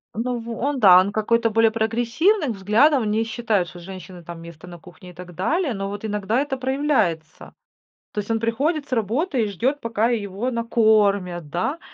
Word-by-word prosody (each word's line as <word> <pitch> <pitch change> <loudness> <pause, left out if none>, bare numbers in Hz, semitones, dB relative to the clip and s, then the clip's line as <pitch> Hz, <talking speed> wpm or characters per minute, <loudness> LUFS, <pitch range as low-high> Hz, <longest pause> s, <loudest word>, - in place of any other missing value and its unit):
Ну 245 +2 -2
в 230 +1 -9
Он, 280 +1 -1
да, 185 -4 +8
он 195 +2 +1
какой-то 230 +2 +1
более 225 0 +3
прогрессивных 240 - +1
взглядов, 225 +8 +3
он 215 - -1
не 220 +2 +1
считает, 220 -5 -1
что 175 0 -11
у - - -13
женщины 185 -1 -10
там 170 0 -9
место 170 +1 -12
на 175 -1 -10
кухне 180 +2 -15
и - - -13
так 180 +1 -11
далее, 280 - -1
но 195 0 -4
вот 205 +2 -6
иногда 210 +2 -1
это 275 -1 -2
проявляется. 260 - -1 0.6
То - - -3
есть, 205 +2 -4
он 225 - +1
приходит 280 +7 -1
с - - -21
работы 245 - 0
и - - -1
ждёт 250 +9 -1
пока 230 0 0
его 210 +1 -2
накормят, 205 -8 +1
да? 185 - -2
220 Hz, 195 wpm, -22 LUFS, 190-245 Hz, 0.6 s, да